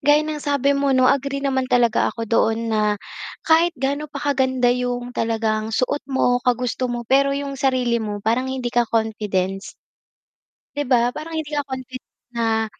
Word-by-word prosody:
gaya 295 Hz, +2 st, +4 dB
ng 305 Hz, -1 st, -4 dB
sabi 280 Hz, -1 st, +1 dB
mo 280 Hz, -1 st, +1 dB
'no 255 Hz, -, +4 dB
agree 275 Hz, 0 st, -2 dB
naman 265 Hz, -2 st, 0 dB
talaga 240 Hz, -2 st, +3 dB
ako 230 Hz, -, -5 dB
doon 225 Hz, 0 st, +1 dB
na, 215 Hz, -1 st, +2 dB, 0.6 s
kahit 330 Hz, +2 st, +3 dB
gaano 280 Hz, +3 st, -2 dB
pa -, -, -9 dB, 0.2 s
kaganda 260 Hz, -2 st, +2 dB
yung 245 Hz, 0 st, -3 dB
talagang 220 Hz, -1 st, -1 dB
suot 255 Hz, +5 st, 0 dB
mo, 250 Hz, -2 st, +2 dB
kagusto 250 Hz, +1 st, 0 dB
mo 240 Hz, -1 st, -4 dB
pero 275 Hz, +3 st, +3 dB
yung 280 Hz, 0 st, -4 dB
sarili 250 Hz, -4 st, +1 dB
mo 210 Hz, -2 st, -3 dB
parang 245 Hz, +4 st, +1 dB
hindi 255 Hz, -2 st, -3 dB
ka 240 Hz, -1 st, +2 dB
confidence. 205 Hz, -4 st, -1 dB, 1.0 s
'Di 290 Hz, -, 0 dB
ba? 245 Hz, -1 st, +3 dB
Parang 320 Hz, +2 st, -7 dB
hindi 310 Hz, -1 st, -4 dB
ka 290 Hz, -, +1 dB
confident 260 Hz, -1 st, -8 dB, 0.2 s
na, 225 Hz, -1 st, +1 dB
250 Hz, 170 wpm, -21 LUFS, 230-275 Hz, 1.0 s, gaya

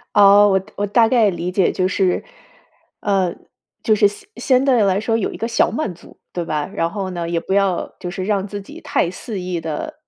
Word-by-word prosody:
哦， 205 Hz, 0 st, +7 dB
我 190 Hz, -1 st, +2 dB, 0.2 s
我 205 Hz, 0 st, -1 dB
大 225 Hz, +2 st, +4 dB
概 230 Hz, -4 st, +4 dB
理 180 Hz, -1 st, -3 dB
解 190 Hz, -1 st, +2 dB
就 185 Hz, 0 st, +1 dB
是， 185 Hz, -1 st, +1 dB, 0.8 s
呃 190 Hz, -4 st, 0 dB, 0.5 s
就 220 Hz, -, +3 dB
是 205 Hz, 0 st, +5 dB
相 205 Hz, 0 st, -9 dB
相 260 Hz, -1 st, +2 dB
对 255 Hz, -4 st, +4 dB
来 195 Hz, -1 st, +2 dB
说 225 Hz, +2 st, 0 dB
有 220 Hz, -, -1 dB
一 -, -, -8 dB
个 -, -, -3 dB
小 230 Hz, 0 st, +2 dB
满 300 Hz, -12 st, -3 dB
足， 170 Hz, -, -17 dB
对 175 Hz, -1 st, -3 dB
吧？ 150 Hz, -2 st, -2 dB
然 165 Hz, -4 st, 0 dB
后 195 Hz, 0 st, -4 dB
呢， 175 Hz, -2 st, -4 dB
也 170 Hz, -, -1 dB
不 -, -, -8 dB
要 195 Hz, -2 st, 0 dB
就 180 Hz, -, -5 dB
是 185 Hz, +1 st, -5 dB
让 200 Hz, -1 st, -1 dB
自 205 Hz, 0 st, -6 dB
己 -, -, -12 dB
太 175 Hz, -, 0 dB
肆 200 Hz, 0 st, -6 dB
意 180 Hz, -1 st, -3 dB
地 165 Hz, -, -5 dB
195 Hz, 240 characters per minute, -20 LUFS, 180-210 Hz, 0.8 s, 哦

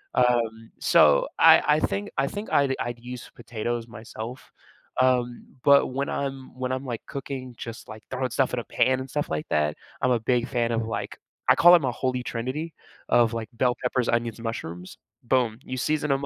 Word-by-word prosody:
Um, 115 Hz, -2 st, +1 dB
so 75 Hz, -2 st, +5 dB
I -, -, +8 dB
I 150 Hz, 0 st, +4 dB
think, 205 Hz, +5 st, -2 dB
I 135 Hz, -, +2 dB
think 205 Hz, +8 st, -6 dB
I'd 140 Hz, -2 st, +3 dB
I'd 120 Hz, 0 st, -3 dB
use 125 Hz, 0 st, -9 dB
potatoes 120 Hz, 0 st, -4 dB
myself, 115 Hz, +2 st, -9 dB, 0.5 s
um, 125 Hz, -2 st, +1 dB, 0.2 s
but 140 Hz, 0 st, +6 dB
when 135 Hz, +2 st, -2 dB
I'm 135 Hz, -1 st, -4 dB
when 130 Hz, 0 st, -2 dB
I'm, 130 Hz, +1 st, -3 dB
like, 120 Hz, -3 st, -4 dB
cooking, 130 Hz, -2 st, -6 dB
just, 115 Hz, +1 st, -8 dB
like, 110 Hz, 0 st, -10 dB
throwing 130 Hz, 0 st, -1 dB
stuff 130 Hz, -2 st, +1 dB
in 125 Hz, -, 0 dB
a -, -, -5 dB
pan 130 Hz, 0 st, +2 dB
and 130 Hz, -, -6 dB
stuff 145 Hz, +2 st, -2 dB
like 75 Hz, -1 st, -3 dB
that, 75 Hz, 0 st, +1 dB, 0.3 s
I'm 125 Hz, -, +2 dB
a 120 Hz, -, +3 dB
big 120 Hz, +1 st, +1 dB
fan 120 Hz, -3 st, 0 dB
of, 115 Hz, -1 st, 0 dB
like 115 Hz, -, -4 dB, 0.3 s
I -, -, +7 dB
call 175 Hz, +1 st, +8 dB
it 170 Hz, -, +3 dB
a 130 Hz, -, +1 dB
holy 125 Hz, 0 st, -2 dB
trinity 130 Hz, +8 st, -4 dB, 0.4 s
of 115 Hz, -1 st, +4 dB
like 115 Hz, -2 st, -4 dB
bell 125 Hz, +1 st, +1 dB
peppers, 125 Hz, -1 st, 0 dB
onions, 115 Hz, -1 st, 0 dB
mushrooms 90 Hz, -6 st, -6 dB, 0.3 s
boom, 120 Hz, -3 st, +1 dB
you 130 Hz, -, -5 dB
season 150 Hz, +3 st, 0 dB
'em 135 Hz, +1 st, 0 dB
125 Hz, 195 wpm, -25 LUFS, 115-135 Hz, 0.5 s, I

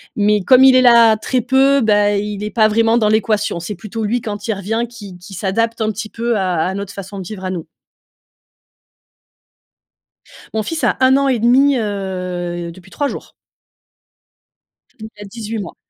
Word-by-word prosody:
Mais 210 Hz, 0 st, +2 dB
comme 255 Hz, +6 st, +5 dB
il 265 Hz, -1 st, +7 dB
est 255 Hz, -, +6 dB
là 235 Hz, -3 st, +6 dB
très 255 Hz, +3 st, -1 dB
peu, 270 Hz, +3 st, +3 dB
beh, 205 Hz, -2 st, +2 dB
il 210 Hz, 0 st, -5 dB
est 210 Hz, -, -4 dB
pas 220 Hz, -2 st, +3 dB
vraiment 225 Hz, +2 st, +2 dB
dans 215 Hz, -2 st, +2 dB
l'équation, 215 Hz, -4 st, 0 dB
c'est 205 Hz, +5 st, -6 dB
plutôt 220 Hz, +4 st, -6 dB
lui 230 Hz, +3 st, -1 dB
quand 205 Hz, 0 st, -6 dB
il 220 Hz, -, 0 dB
revient 215 Hz, +4 st, -2 dB
qui 205 Hz, -6 st, -11 dB
qui 180 Hz, +2 st, -13 dB
s'adapte 225 Hz, +5 st, -2 dB
un 215 Hz, -, 0 dB
petit 215 Hz, +1 st, -6 dB
peu 230 Hz, -1 st, -2 dB
à 185 Hz, -2 st, -1 dB, 0.2 s
à -, -, -5 dB
notre 200 Hz, 0 st, -6 dB
façon 195 Hz, 0 st, -8 dB
de -, -, -6 dB
vivre 190 Hz, -3 st, -8 dB
à -, -, -2 dB
nous. 175 Hz, -4 st, -5 dB, 2.9 s
Mon 220 Hz, -, 0 dB
fils 320 Hz, +8 st, -4 dB
a -, -, +1 dB
1 260 Hz, 0 st, +5 dB
an 275 Hz, 0 st, +1 dB
et 255 Hz, -3 st, +1 dB
demi, 260 Hz, +5 st, +3 dB
heu, 180 Hz, -4 st, -4 dB
depuis 185 Hz, +2 st, -16 dB
3 285 Hz, +5 st, -2 dB
jours. -, -, -8 dB, 1.7 s
Il 220 Hz, 0 st, -8 dB
a -, -, -8 dB
18 220 Hz, +1 st, -6 dB
mois. 190 Hz, -4 st, -7 dB
215 Hz, 185 wpm, -17 LUFS, 195-235 Hz, 2.9 s, il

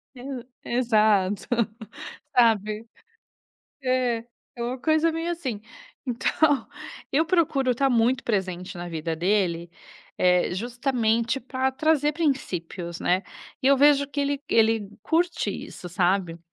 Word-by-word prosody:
E 255 Hz, -1 st, -7 dB, 0.2 s
exato, 215 Hz, -5 st, +2 dB, 0.9 s
sabe, 220 Hz, -2 st, +2 dB, 1.0 s
é, 255 Hz, -3 st, 0 dB, 0.3 s
é 235 Hz, -, -4 dB
uma 250 Hz, +2 st, -3 dB
coisa 315 Hz, +4 st, +2 dB
bem 330 Hz, +1 st, -3 dB
assim, 275 Hz, -11 st, -3 dB, 0.5 s
então, 280 Hz, +4 st, +1 dB, 0.4 s
eu 310 Hz, +4 st, +3 dB
procuro 310 Hz, -6 st, +2 dB
estar 270 Hz, +3 st, +2 dB
muito 245 Hz, +1 st, +2 dB
presente 185 Hz, -5 st, -2 dB
na 175 Hz, 0 st, -6 dB
vida 160 Hz, 0 st, -3 dB
dele, 175 Hz, -2 st, 0 dB, 0.8 s
justamente 235 Hz, +2 st, 0 dB
para 260 Hz, +1 st, -1 dB
trazer 300 Hz, +1 st, +2 dB
princípios, 180 Hz, -, -2 dB
né, 180 Hz, +2 st, +2 dB, 0.4 s
e 265 Hz, -, +4 dB
eu 275 Hz, -, +6 dB
vejo 285 Hz, 0 st, +5 dB
que 285 Hz, +1 st, -3 dB
ele 280 Hz, 0 st, -1 dB
ele 225 Hz, -2 st, +3 dB
curte 335 Hz, +1 st, 0 dB
isso, 180 Hz, -, -8 dB
sabe, 175 Hz, -1 st, 0 dB
240 Hz, 115 wpm, -25 LUFS, 200-275 Hz, 1.0 s, eu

